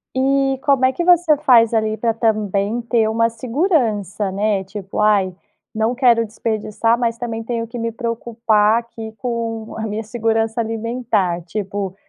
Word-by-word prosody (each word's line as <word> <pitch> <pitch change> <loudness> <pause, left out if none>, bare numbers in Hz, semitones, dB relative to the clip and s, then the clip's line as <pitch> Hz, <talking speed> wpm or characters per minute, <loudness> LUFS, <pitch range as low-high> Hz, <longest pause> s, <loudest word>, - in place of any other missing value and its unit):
E 270 0 +1
como 275 -2 +3
é 260 - +4
que 345 - -2
você 350 -3 +5
faz 235 -4 +4
ali 220 -1 0
para 230 +1 0
também 215 -1 0
ter 230 -2 +1
uma 230 +1 +2
segurança, 230 - -1
né? 200 0 0
Tipo, 195 0 -7
aí 200 -3 +2 0.4
não 220 +3 0
quero 240 -3 +4
desperdiçar, 225 +1 -1
mas 235 -1 0
também 230 -2 -4
tenho 230 0 -3
que 240 +1 -7
me 230 0 -2
preocupar 230 -2 +1
aqui 230 -1 -6
com 230 -2 -4
a 220 0 -4
minha 215 +1 -4
segurança 225 0 -1
alimentar. 225 -5 -1
Tipo 200 +1 -3
o 190 - -14
225 Hz, 160 wpm, -19 LUFS, 215-240 Hz, 0.4 s, você